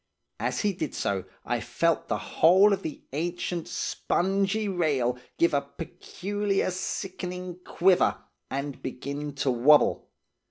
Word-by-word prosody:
As -, -, -1 dB
he 205 Hz, -2 st, +1 dB
did 155 Hz, -5 st, -4 dB
so, 95 Hz, -2 st, -1 dB, 0.2 s
I -, -, 0 dB
felt -, -, 0 dB
the -, -, 0 dB
whole 190 Hz, +5 st, +5 dB
of 195 Hz, -, -1 dB
the 155 Hz, -, -6 dB
ancient, 175 Hz, +2 st, -2 dB
spongy 195 Hz, +3 st, 0 dB
rail 145 Hz, -10 st, +1 dB, 0.2 s
give 170 Hz, -, +3 dB
a 140 Hz, -, +3 dB
peculiar, 195 Hz, +7 st, -3 dB
sickening 180 Hz, -1 st, -4 dB
quiver, 185 Hz, 0 st, +3 dB, 0.3 s
and 140 Hz, 0 st, -4 dB
begin 140 Hz, +3 st, -4 dB
to 135 Hz, -1 st, +1 dB
wobble. 135 Hz, +5 st, +4 dB
175 Hz, 125 wpm, -27 LUFS, 140-190 Hz, 0.3 s, whole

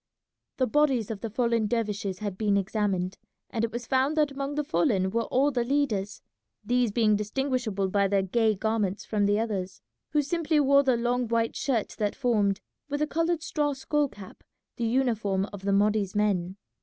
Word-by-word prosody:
The 260 Hz, -, +2 dB
bodies 260 Hz, -4 st, +2 dB
of 210 Hz, -, -6 dB
the 230 Hz, -, -3 dB
fallen 230 Hz, -1 st, +1 dB
dervishes 210 Hz, -4 st, -2 dB
had 205 Hz, -1 st, -4 dB
been 205 Hz, 0 st, +1 dB
examined, 195 Hz, -2 st, -1 dB, 0.3 s
and 225 Hz, -, -1 dB
it 230 Hz, -, 0 dB
was 240 Hz, +1 st, -5 dB
found 270 Hz, +5 st, +1 dB
that 300 Hz, -2 st, +3 dB
among 275 Hz, +1 st, -4 dB
the 300 Hz, -, 0 dB
fallen 220 Hz, -, +1 dB
were 230 Hz, +2 st, 0 dB
all 275 Hz, +3 st, +2 dB
the 245 Hz, -3 st, 0 dB
leaders, 235 Hz, -7 st, -1 dB, 0.4 s
these 245 Hz, 0 st, +2 dB
being 215 Hz, -1 st, +3 dB
distinguishable 215 Hz, -2 st, -1 dB
by 200 Hz, +1 st, +2 dB
their 195 Hz, 0 st, +2 dB
gay 220 Hz, +3 st, +2 dB
garments 210 Hz, -1 st, -1 dB
from 205 Hz, -2 st, +1 dB
the 205 Hz, +1 st, +2 dB
others, 195 Hz, -5 st, -3 dB, 0.3 s
who 300 Hz, -1 st, +1 dB
simply 320 Hz, 0 st, +1 dB
wore 280 Hz, 0 st, +5 dB
the 260 Hz, -3 st, +2 dB
long 245 Hz, +1 st, 0 dB
white 230 Hz, 0 st, 0 dB
shirt 240 Hz, -7 st, 0 dB
that 205 Hz, -1 st, 0 dB
formed, 210 Hz, -6 st, +1 dB, 0.3 s
with 290 Hz, +1 st, -1 dB
a -, -, +3 dB
coloured 330 Hz, +1 st, 0 dB
straw 295 Hz, -3 st, 0 dB
skull 290 Hz, +2 st, 0 dB
cap, 200 Hz, -6 st, -13 dB, 0.3 s
the 235 Hz, -, -2 dB
uniform 225 Hz, -6 st, +1 dB
of 200 Hz, -, -7 dB
the 200 Hz, +1 st, -1 dB
Mahdi's 205 Hz, -1 st, +2 dB
men. 195 Hz, -3 st, 0 dB
225 Hz, 185 wpm, -27 LUFS, 205-270 Hz, 0.4 s, wore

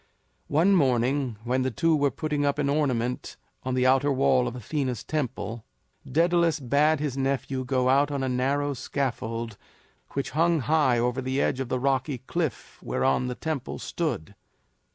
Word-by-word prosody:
One 165 Hz, +7 st, +3 dB
morning 130 Hz, -, +2 dB
when 125 Hz, +2 st, 0 dB
the 130 Hz, -, +1 dB
two 160 Hz, +8 st, +2 dB
were 145 Hz, -1 st, +2 dB
putting 150 Hz, +3 st, -2 dB
up 140 Hz, 0 st, +1 dB
an 145 Hz, -1 st, 0 dB
ornament 125 Hz, -5 st, -1 dB, 0.2 s
on 130 Hz, 0 st, -2 dB
the 130 Hz, 0 st, +2 dB
outer 135 Hz, +2 st, +4 dB
wall 70 Hz, -, +3 dB
of -, -, -4 dB
Athena's 125 Hz, 0 st, -3 dB
temple, 130 Hz, -6 st, -3 dB, 0.5 s
Daedalus 170 Hz, +1 st, +3 dB
bade 145 Hz, +4 st, +2 dB
his 145 Hz, -3 st, -2 dB
nephew 135 Hz, -1 st, -1 dB
go 130 Hz, 0 st, +1 dB
out 140 Hz, +2 st, +4 dB
on 140 Hz, -2 st, -2 dB
a -, -, 0 dB
narrow 140 Hz, +3 st, 0 dB
scaffold 115 Hz, -4 st, -3 dB, 0.6 s
which 140 Hz, -, -2 dB
hung 165 Hz, +2 st, +2 dB
high 140 Hz, -1 st, +3 dB
over 125 Hz, +2 st, 0 dB
the 130 Hz, +1 st, -1 dB
edge 130 Hz, -, +1 dB
of 135 Hz, -3 st, -3 dB
the 130 Hz, -, 0 dB
rocky 135 Hz, +1 st, 0 dB
cliff 145 Hz, +2 st, -4 dB
whereon 65 Hz, -, +1 dB
the 125 Hz, -, -3 dB
temple 155 Hz, -2 st, -4 dB
stood. 155 Hz, -, -3 dB
135 Hz, 165 wpm, -26 LUFS, 125-145 Hz, 0.6 s, outer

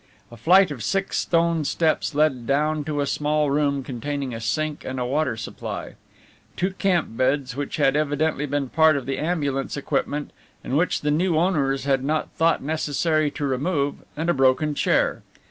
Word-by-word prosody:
A -, -, -10 dB
flight 180 Hz, -, +5 dB
of 125 Hz, -6 st, -6 dB
six 195 Hz, -, 0 dB
stone 165 Hz, -1 st, +1 dB
steps 155 Hz, 0 st, 0 dB
led 140 Hz, -6 st, +1 dB
down 150 Hz, +2 st, +1 dB
to 145 Hz, -1 st, -1 dB
a -, -, +1 dB
small 150 Hz, 0 st, 0 dB
room 140 Hz, -1 st, +1 dB
containing 135 Hz, +1 st, -4 dB
a 115 Hz, -, -6 dB
sink 150 Hz, +6 st, -2 dB
and 130 Hz, 0 st, -4 dB
a 125 Hz, -, -1 dB
water 140 Hz, -2 st, 0 dB
supply, 110 Hz, -, -6 dB, 0.6 s
two 185 Hz, +2 st, 0 dB
camp 185 Hz, -, 0 dB
beds 130 Hz, 0 st, 0 dB
which 145 Hz, 0 st, -4 dB
had 140 Hz, -2 st, +3 dB
evidently 150 Hz, 0 st, 0 dB
been 145 Hz, -1 st, -1 dB
part 160 Hz, 0 st, +4 dB
of 135 Hz, -, -5 dB
the 135 Hz, 0 st, -3 dB
ambulance 145 Hz, -5 st, -1 dB
equipment 145 Hz, +1 st, -2 dB, 0.3 s
and 130 Hz, -, -3 dB
which 170 Hz, +5 st, +1 dB
the 150 Hz, -, 0 dB
new 165 Hz, +2 st, +1 dB
owners 145 Hz, -6 st, +1 dB
had 135 Hz, -2 st, +1 dB
not 155 Hz, +2 st, -1 dB
thought 165 Hz, -3 st, +1 dB
necessary 155 Hz, +1 st, 0 dB
to 145 Hz, 0 st, -4 dB
remove, 140 Hz, +2 st, 0 dB, 0.2 s
and 160 Hz, +2 st, -2 dB
a 175 Hz, -, +3 dB
broken 135 Hz, +3 st, +2 dB
chair. -, -, +1 dB
145 Hz, 180 wpm, -23 LUFS, 135-155 Hz, 0.6 s, flight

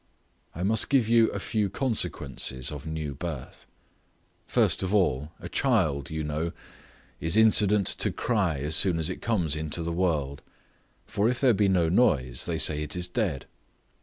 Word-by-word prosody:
I 85 Hz, -, -4 dB
must 110 Hz, +2 st, +1 dB
give 130 Hz, -6 st, +3 dB
you 115 Hz, -1 st, +4 dB
a -, -, -5 dB
few 105 Hz, -3 st, -1 dB
consequences 85 Hz, -, -3 dB
of 75 Hz, +1 st, -8 dB
new 80 Hz, -2 st, -4 dB
birth. 70 Hz, -3 st, -7 dB, 0.8 s
First -, -, +2 dB
of 95 Hz, +2 st, -1 dB
all, 75 Hz, -6 st, +1 dB
a -, -, -8 dB
child, 90 Hz, -, +1 dB
you 80 Hz, 0 st, -3 dB
know, 75 Hz, +3 st, -3 dB, 0.7 s
is 80 Hz, +5 st, +1 dB
incident 105 Hz, -2 st, +5 dB
to -, -, +1 dB
cry 100 Hz, -, 0 dB
as 75 Hz, +3 st, -1 dB
soon 90 Hz, -1 st, +3 dB
as 80 Hz, -1 st, -1 dB
it -, -, -7 dB
comes 90 Hz, -10 st, 0 dB
into 80 Hz, +2 st, -4 dB
the 85 Hz, 0 st, -3 dB
world; 75 Hz, -6 st, -1 dB, 0.6 s
for 105 Hz, +3 st, 0 dB
if 125 Hz, -, -1 dB
there 130 Hz, -3 st, +4 dB
be 105 Hz, -1 st, +2 dB
no 90 Hz, -3 st, +2 dB
noise, 70 Hz, -, +1 dB
they -, -, -1 dB
say 75 Hz, 0 st, +1 dB
it 75 Hz, +2 st, -4 dB
is 90 Hz, 0 st, -2 dB
dead. 90 Hz, -, -2 dB
85 Hz, 170 wpm, -27 LUFS, 75-105 Hz, 0.8 s, incident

